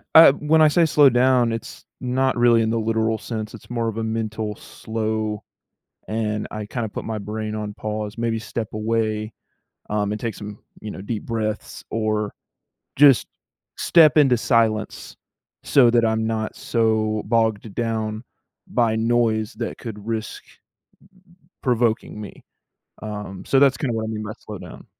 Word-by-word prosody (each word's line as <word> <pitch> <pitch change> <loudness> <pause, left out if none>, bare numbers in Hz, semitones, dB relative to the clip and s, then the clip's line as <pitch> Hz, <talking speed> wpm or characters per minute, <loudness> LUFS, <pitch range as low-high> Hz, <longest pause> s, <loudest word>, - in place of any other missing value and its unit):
Uh, 160 -3 +10
when 150 +2 +2
I 155 - +8
say 165 +3 +4
slow 150 -3 +6
down, 125 -1 +3
it's 115 0 -7
not 130 0 0
really 120 -1 +5
in 110 - +1
the 115 0 0
literal 110 0 0
sense, 110 -1 -5
it's 115 - -13
more 115 -1 -1
of 110 - -3
a 115 - -1
mental 110 -1 -3
slow, 110 -1 -3 0.7
and 105 -1 -2
I 105 -1 -5
kinda 115 +1 -3
put - - -6
my 110 - -3
brain 110 +1 -4
on 105 -1 -4
pause, 105 +1 -5
maybe 115 -1 0
step 110 -1 -4
away, 110 0 -1 0.6
um, 105 -1 0
and 105 - -3
take 115 -1 -3
some, 105 0 -8 0.2
you 110 - -6
know, 95 - -8
deep 105 +2 -4
breaths, 110 -2 -3
or, 110 -2 -1 0.6
just 140 -2 +6 0.5
step 160 -4 +5
into 135 -5 +5
silence, 115 -3 0 0.5
so 130 -4 +5
that 115 -1 +3
I'm 110 0 +1
not 110 -1 -2
so 110 -2 0
bogged 110 -2 0
down 110 -1 -2 0.4
by 115 -2 +1
noise 110 -1 +1
that - - -4
could 105 -3 -8
risk 110 -1 -4 1.2
provoking 120 -4 0
me. 105 - -10 0.6
Um, 105 -3 -6
so 135 - +2
that's 140 -1 +5
kinda 135 -6 -2
what 110 0 -2
I - - -4
mean 110 -1 -4
by 110 - -5
slow 105 - -8
down, - - -11
110 Hz, 160 wpm, -22 LUFS, 110-120 Hz, 1.2 s, Uh